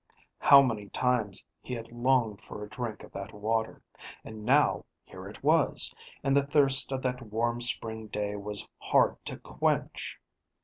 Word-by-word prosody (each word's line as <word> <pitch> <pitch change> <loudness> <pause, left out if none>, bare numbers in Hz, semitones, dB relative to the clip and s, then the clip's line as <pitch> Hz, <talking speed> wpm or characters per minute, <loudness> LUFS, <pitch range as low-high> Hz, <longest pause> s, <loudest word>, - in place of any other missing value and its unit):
How 140 -1 +8
many 105 -6 -2
times 120 -6 0 0.2
he 125 - -5
had 115 -1 -8
longed 120 -3 +1
for 105 - -9
a 105 - -9
drink 115 -3 -5
of - - -13
that 100 +2 -7
water, 110 +2 -2 0.4
and 110 -1 -9
now 140 +6 +3 0.2
here - - -11
it - - -13
was, - - +3 0.3
and 135 0 +2
the 140 - +5
thirst 140 -2 +3
of 130 -1 -3
that 125 0 -2
warm 120 +1 -2
spring 110 -3 +1
day 105 0 -3
was 105 0 -2
hard - - +2
to - - -5
quench! - - -2
115 Hz, 165 wpm, -29 LUFS, 105-130 Hz, 0.4 s, How